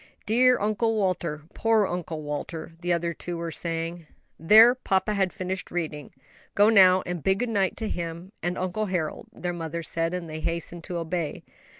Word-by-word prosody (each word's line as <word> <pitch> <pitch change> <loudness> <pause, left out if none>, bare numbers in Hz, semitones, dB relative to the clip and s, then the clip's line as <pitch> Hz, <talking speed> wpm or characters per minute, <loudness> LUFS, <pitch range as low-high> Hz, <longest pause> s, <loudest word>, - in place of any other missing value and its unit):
"Dear 250 +3 +4
Uncle 215 +2 +1
Walter," 175 -7 -1
"Poor 225 -2 +3
Uncle 170 -4 -4
Walter!" 150 +3 -5
the 175 0 -1
other 170 0 0
two 175 +1 -5
were 165 0 -4
saying. 165 0 -3 0.3
"There, 220 +9 +8
papa 210 -5 0
has 195 -2 +2
finished 185 0 -4
reading; 155 -4 -4 0.4
go 205 +1 +6
now 185 -4 +6
and 175 -2 -4
bid 190 +5 +2
good 245 +3 -1
night 195 -4 0
to 220 - -3
him 170 0 -5
and 175 +2 -2
Uncle 185 +4 -2
Harold," 175 -5 -3
their 180 0 -4
mother 165 0 -4
said; 165 +2 -1
and 175 -2 -5
they 155 0 -6
hastened 170 +1 -3
to 175 - -4
obey. 165 -2 -3
175 Hz, 180 wpm, -26 LUFS, 165-195 Hz, 0.4 s, There